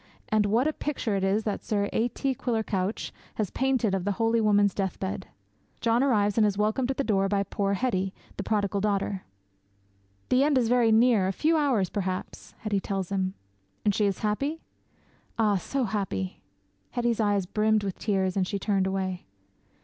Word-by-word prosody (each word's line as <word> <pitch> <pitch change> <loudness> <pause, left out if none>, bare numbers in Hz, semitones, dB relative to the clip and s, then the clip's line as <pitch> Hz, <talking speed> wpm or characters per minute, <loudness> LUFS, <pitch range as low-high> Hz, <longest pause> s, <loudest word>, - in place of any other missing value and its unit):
And 215 -1 +3
what 230 +6 +2
a 310 - 0
picture 265 -9 -2
it 195 - -1
is 200 +3 +2
that 210 -2 -3
Sir 205 -2 0
A. 230 - +2
T. 270 +2 -2
Quiller 230 -3 -1
Couch 195 0 -2 0.2
has 210 -4 -2
painted 260 -6 +1
of 190 -2 0
the 205 +1 0
holy 225 +2 +2
woman's 205 -2 +4
deathbed! 190 0 -3 0.5
John 230 +1 +2
arrives 210 -6 +2
and 215 - +5
is 200 -1 -1
welcomed 215 +5 +1
at 270 - -1
the 275 - +1
door 195 -5 +1
by 200 0 +1
poor 200 0 -1
Hetty, 195 -5 0 0.2
the - - -4
prodigal 200 -1 0
daughter. 200 -2 -1 1.0
'"The 255 +2 +4
end 290 -1 +3
is 235 -3 +2
very 240 -2 +4
near 220 -3 +4
a - - +1
few 315 - +2
hours 265 - +2
perhaps!" 185 -2 -4
Hetty 210 -3 0
tells 195 -1 -3
him. 190 -1 -1 0.5
'"And 205 - +4
she 210 +1 +2
is 195 - -1
happy?" 275 +10 -1 0.8
'"Ah, 210 -3 +3
so 265 +9 -2
happy!" 190 - -3 0.5
Hetty's 240 -2 0
eyes 205 -3 +2
brimmed 215 +2 +2
with 195 -2 -4
tears 190 -3 0
and 190 -2 +1
she 200 - -2
turned 195 -1 +1
away. 190 - -3
205 Hz, 185 wpm, -27 LUFS, 195-230 Hz, 1.0 s, and